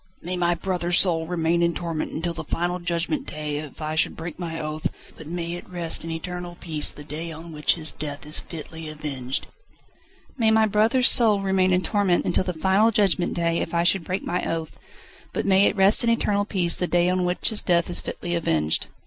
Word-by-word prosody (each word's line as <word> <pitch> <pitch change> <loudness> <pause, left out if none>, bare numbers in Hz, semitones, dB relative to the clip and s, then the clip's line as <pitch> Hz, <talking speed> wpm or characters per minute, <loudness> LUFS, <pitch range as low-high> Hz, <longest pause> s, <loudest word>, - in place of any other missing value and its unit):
"May 180 +2 -3
my 175 -1 +1
brother's 175 0 +1
soul 165 -4 +2
remain 170 0 0
in 170 0 +1
torment 165 -3 -3
until 170 +1 -2
the 165 - -5
final 175 +1 -2
Judgment 175 - -2
Day 150 -1 -4
if 150 0 -9
I 155 0 -2
should 160 - +1
break 165 +1 -7
my 165 -2 -4
oath, 155 0 -3 0.3
but 160 - -11
may 170 0 -4
it 175 - -8
rest 170 -3 0
in 165 - -6
eternal 175 +1 -6
peace 155 -3 +1
the 145 - -10
day 155 +3 -6
on 165 +1 -9
which 150 0 +2
his 160 -2 0
death 145 -1 -5
is 150 +1 0
fitly 160 -1 -8
avenged." 140 -4 -2 0.9
"May 225 -2 +4
my 220 0 +4
brother's 220 +5 +4
soul 220 -5 +4
remain 190 -1 +2
in 180 0 +3
torment 200 -4 +1
until 175 - +2
the 180 - -1
final 190 +6 +2
Judgment 195 -5 +1
Day 170 -1 0
if 165 - -3
I 170 - +2
should 175 +1 +2
break 185 +3 -3
my 180 - -2
oath, 165 -1 -3 0.6
but - - -2
may 195 0 +5
it - - 0
rest 195 +3 +5
in 235 - +2
eternal 205 -3 +1
peace 180 -5 +1
the 180 - -1
day 175 0 +2
on 185 0 +1
which 180 0 +2
his 220 -2 0
death 170 -1 +2
is 175 - 0
fitly 175 - -4
avenged." 80 - +1
175 Hz, 215 wpm, -24 LUFS, 160-185 Hz, 0.9 s, may